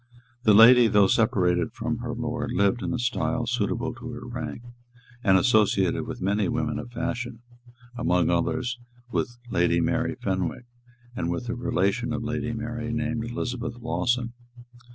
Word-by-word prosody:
The 105 -2 +6
lady, 120 +2 +8
though 105 -2 +5
separated 90 -5 +2
from 120 -1 -3
her 120 -1 -4
lord, 120 0 -3
lived 105 0 +2
in 90 -3 -2
a - - -1
style 120 -1 -1
suitable 120 +2 -1
to 120 0 -8
her 120 +1 -8
rank, 120 -1 -6 0.6
and 95 -3 +5
associated 105 -5 +2
with - - -6
many 100 +1 +1
women - - -1
of 120 - -7
fashion, 120 0 -4 0.5
among 90 -6 +2
others, 120 +8 -1 0.3
with 120 0 -2
Lady 85 0 +2
Mary 85 - 0
Fenwick, 95 +4 -2 0.5
and 85 - -2
with 115 +8 -3
a - - 0
relation 115 +2 0
of 115 0 -3
Lady 120 0 -2
Mary, 115 0 -4
named 115 0 -2
Elizabeth 120 0 -4
Lawson. 120 0 -1
115 Hz, 155 wpm, -26 LUFS, 100-120 Hz, 0.6 s, lady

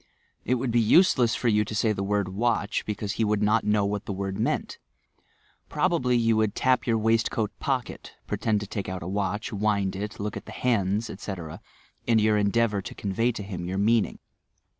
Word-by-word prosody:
It 125 - +2
would 125 0 -2
be 120 0 +3
useless 120 - +4
for 125 - -1
you 105 -2 +3
to 105 +1 -6
say 110 +1 +2
the 100 - -2
word 100 -1 0
'watch,' 105 +1 -1
be 105 - -1
cause 105 0 -4
he 115 - -1
would 105 -1 +1
not 110 +2 +3
know 105 -1 +2
what 100 0 -3
the - - -2
word 95 0 -4
meant. - - -1 0.9
Prob 180 -1 +1
ably 125 -7 +2
you 115 -1 +3
would 110 -2 +1
tap 130 -1 +2
your 115 -1 +3
waistcoat 110 -1 +1
pocket, 130 -5 -3
pretend 105 -2 0
to - - -4
take 100 -1 -5
out 95 -2 -5
a - - -6
watch, 100 +3 -2
wind 100 -2 0
it, 105 +3 -5
look 105 0 -3
at - - -8
the - - -8
hands, 110 -2 0
etc., 95 -5 -7 0.5
in 115 -1 +4
your 110 0 +3
endeavour 105 0 +1
to - - -8
convey 110 +5 0
to 110 - -6
him 90 -3 -6
your 95 +1 -3
meaning. 110 +2 +2
105 Hz, 205 wpm, -26 LUFS, 100-115 Hz, 0.9 s, useless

